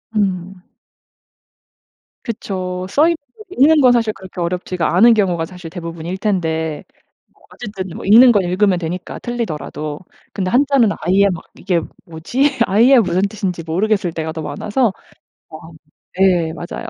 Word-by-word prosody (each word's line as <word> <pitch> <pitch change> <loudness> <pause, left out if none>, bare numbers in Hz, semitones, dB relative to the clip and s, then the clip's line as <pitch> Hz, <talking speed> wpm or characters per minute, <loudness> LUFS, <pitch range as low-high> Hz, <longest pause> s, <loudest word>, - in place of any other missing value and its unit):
음. 190 -2 -2 1.6
그쵸. 185 -5 -4
써 295 - +3
있는 340 - +2 0.2
걸 430 - -13
읽는 310 -2 +4
건 255 -2 +6
사실 230 -3 +1
그렇게 185 -2 -11
어렵지가 180 0 -2
않은 230 +6 +7
경우가 180 -6 0
사실 180 0 -10
대부분일 170 +1 -6
텐데 160 -6 -2 0.5
뭐 - - -30
어쨌든 200 -5 -7
뭐 - - -8
읽는 235 +5 +8
건 205 -4 +2
읽으면 185 +1 +1
되니까 175 +2 -5
틀리더라도. 155 - -5 0.3
근데 190 -2 -2
한자는 275 -3 +3
아예 190 +4 +3
막 175 -2 -5
이게 180 -3 -1 0.2
뭐지? 245 - -1
아예 235 +7 +5
무슨 180 -3 +1
뜻인지 190 -4 -4
모르겠을 190 +2 0
때가 160 -1 -4
더 160 - -5
많아서 215 - -1 0.6
아 - - -11 0.6
예. 180 -4 +3
맞아요. 170 +2 -7
190 Hz, 300 characters per minute, -18 LUFS, 170-220 Hz, 1.6 s, 읽는